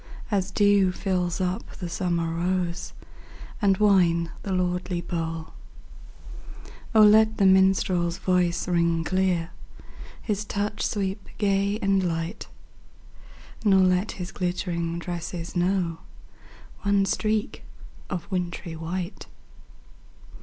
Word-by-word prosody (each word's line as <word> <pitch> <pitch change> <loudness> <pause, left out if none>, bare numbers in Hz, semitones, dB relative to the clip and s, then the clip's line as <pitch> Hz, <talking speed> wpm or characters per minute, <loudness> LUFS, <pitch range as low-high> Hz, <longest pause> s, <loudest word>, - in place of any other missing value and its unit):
As 195 -2 0
dew 200 -1 +4
fills 180 -3 -1
up 185 0 -3
the 180 - -5
summer 170 -1 -1
rose 175 0 -2 0.7
And 195 -2 +3
wine 175 -5 +3
the 195 - -5
lordly 180 -1 -1
bowl! 165 -2 -4 1.4
let 220 0 +6
the 200 - +3
minstrePs 190 -2 +3
voice 180 -2 +1
ring 170 -2 +1
clear. 180 -1 0 0.7
His 210 -2 -2
touch 210 0 -3
sweep 195 0 -2
gay 200 0 +1
and 195 -1 +3
light; 165 +1 -3 1.2
Nor 195 -3 +5
let 185 +2 +2
his 180 -1 -6
glittering 170 -2 -2
tresses 170 0 -5
know 175 -2 0 0.8
One 200 -1 +2
streak 215 +1 -1 0.5
of 180 -4 -4
wintry 175 -2 -3
white. 175 +4 -5
185 Hz, 105 wpm, -25 LUFS, 170-195 Hz, 1.4 s, let